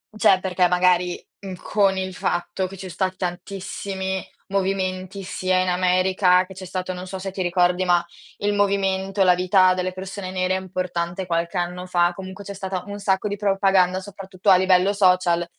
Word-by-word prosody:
Cioè 195 -2 +4
perché 185 -1 +1
magari, 180 0 +2 0.2
mhmm, 190 -2 -7
con 195 +1 +1
il 185 0 -3
fatto 180 +2 -2
che 195 +1 -11
ci 190 0 -7
so 175 - -9
stati 185 0 -2
tantissimi 190 +1 -4 0.3
movimenti 190 0 -2
sia 185 0 -1
in 185 - +1
America, 185 0 +3
che 190 - -12
c'è 190 0 -9
stato, 185 0 -4
non 180 +1 -7
so 190 0 -6
se 195 0 -5
ti 190 - -5
ricordi 180 0 +2
ma, 175 -1 +3 0.3
il 205 0 0
movimento, 195 -1 0
la 180 -1 +5
vita 185 0 +4
delle 185 0 -2
persone 190 0 -6
nere 185 0 0
è - - -1
importante 185 -1 -3
qualche 170 0 -1
anno 180 +1 -3
fa, 175 -1 +2
comunque 190 +1 -9
c'è 200 - -6
stata 190 -2 -4
un 205 0 -6
sacco 195 +1 0
di 205 - -2
propaganda, 195 -2 +2
soprattutto 195 0 -4
a 185 - +9
livello 185 +1 +3
social, 180 -3 +3
185 Hz, 185 wpm, -23 LUFS, 180-195 Hz, 0.3 s, a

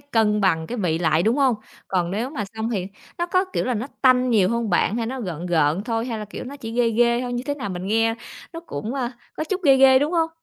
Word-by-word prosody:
cân 220 -6 +1
bằng 165 -4 +1
cái 245 - -5
vị 165 -4 0
lại, 160 -1 +2
đúng 225 +6 +2
hông? 270 -4 +3 0.3
Còn 180 -2 0
nếu 230 +7 -2
mà 225 -9 -3
xong 220 +1 -3
thì 190 -5 -2 0.3
nó 345 - 0
có, 370 +2 +2
kiểu - - 0
là, 250 -1 0
nó 225 +4 -3 0.2
tanh 255 -1 +4
nhiều 200 -5 +4
hông 235 -2 -1
bạn, 195 +4 +2
hay 230 -1 -1
nó 260 +1 -4
gợn 175 -4 -5
gợn 160 +1 +2
thôi, 230 0 -1
hay 225 -3 -3
là, 210 - -5
kiểu, 210 - -8
nó 280 +3 -8
chỉ 225 -4 -7
ghê 235 -1 +2
ghê 235 +1 +3
thôi, 245 -1 -4
như 245 0 -2
thế 285 - -1
nào 255 -8 -5
mình 180 0 -5
nghe 225 +2 +2 0.4
nó 330 - -6
cũng, 225 - -5
à, 255 -2 -2 0.2
có 310 - -2
chút 375 +2 -2
ghê 275 -2 +6
ghê, 265 0 +7
đúng 295 +5 0
hông? 325 -1 +2
230 Hz, 275 wpm, -23 LUFS, 195-260 Hz, 0.4 s, ghê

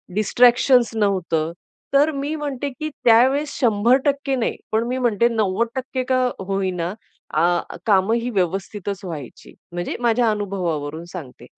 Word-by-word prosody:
Distractions 240 +2 +4
नव्हतं. 180 -6 0 0.4
तर 290 +3 +4
मी 285 +2 -3
म्हणते, 285 -2 -3
की 305 +4 -5 0.2
त्यावेळेस 260 +6 +5
100% 265 +4 +2
नाही, 240 - -1 0.2
पण 220 +1 +2
मी 255 +1 -2
म्हणते 235 -3 +2
90% 235 +5 -1
का 255 - +3 0.3
होईना, 185 -3 -1 0.4
अ, 175 0 +1
कामं 200 +1 +3
ही 235 +1 -2
व्यवस्थितच 195 0 -2
व्हायची, 150 -8 -8 0.2
म्हणजे 175 0 -4
माझ्या 235 -1 +2
अनुभवावरून 170 -7 -3
सांगते. 150 -9 -9
225 Hz, 125 wpm, -21 LUFS, 185-255 Hz, 0.4 s, त्यावेळेस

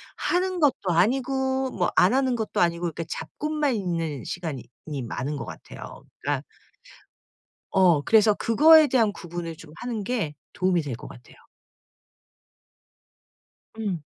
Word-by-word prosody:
하는 365 0 0
것도 265 -10 +2
아니고 265 +7 +1
뭐 175 - 0
안 185 +5 +5
하는 260 -1 +2
것도 220 -1 -1
아니고 170 0 +1
그러니까 165 -1 -2
잡고만 300 - -2
있는 165 - -2
시간이 160 -8 -5 0.2
이 145 -3 -4
많은 130 +5 -4
것 140 - -5
같아요. - - -10 0.2
그러니까 - - -1 1.3
어 180 -5 +4
그래서 215 +4 +5
그거에 310 +9 +6
대한 230 -5 +3
구분을 175 -3 -6
좀 155 -1 -14
하는 240 -3 -4
게 205 -10 -2 0.2
도움이 180 -2 +1
될 140 -4 -4
것 - - -10
같아요. 120 - -15 2.4
음. 200 -7 -2
190 Hz, 270 characters per minute, -25 LUFS, 165-260 Hz, 2.4 s, 그거에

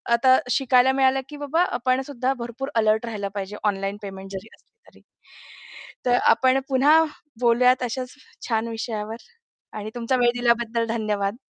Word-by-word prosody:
आता 260 +2 +5
शिकायला 260 -1 +4
मिळालं, 265 0 +2
की 295 - -9
"बाबा, 320 +5 +2
आपणसुद्धा 255 +1 -1
भरपूर 245 +4 -6
अलर्ट 220 0 +2
राहिला 210 -3 -4
पाहिजे, 200 0 -5
ऑनलाईन 195 -1 -1
पेमेंट 195 -1 -8
जरी 195 +2 -7
असली - - -36 0.2
तरी." - - -21 1.0
तर 245 0 +3 0.2
आपण 260 +2 +3
पुन्हा 290 +5 +5 0.4
बोलूयात 250 +2 +4
अशाच 250 +2 -4 0.3
छान 225 0 0
विषयावर. 225 -1 -5 0.6
आणि 215 0 -6
तुमचा 240 +2 -1
वेळ 240 -1 +4
दिल्याबद्दल 235 -1 +1
धन्यवाद. 210 -3 -1
235 Hz, 140 wpm, -23 LUFS, 215-260 Hz, 1.0 s, आता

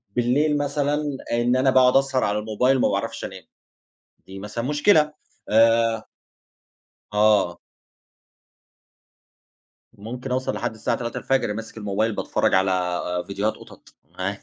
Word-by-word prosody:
بالليل 145 +5 +2
مثلًا 145 0 -1
آآ، 120 0 +1
إن 120 +1 +2
أنا 130 +1 +3
باقعد 130 0 +5
أسهر 135 -1 +1
على 105 +1 0
الموبايل 125 +5 +1
ما - - +3
باعرفش - - -3
أنام - - -9 0.8
دي 95 0 -9
مثلًا 105 +4 -5
مشكلة. 150 +2 +3 0.4
آآ 115 0 +3 1.1
آه. 105 -5 +3 2.3
ممكن 125 +5 -7
أوصل 130 +1 -1
لحد - - -3
الساعة 110 - -2
03:00 120 -1 -5
الفجر 125 -5 0
ماسك 115 +1 -8
الموبايل 105 +1 -1
باتفرج - - 0
على 90 -2 +1 0.3
فيديوهات 100 +2 -1
قطط - - -16 0.2
عا 100 +2 -2
115 Hz, 125 wpm, -23 LUFS, 105-135 Hz, 2.3 s, باقعد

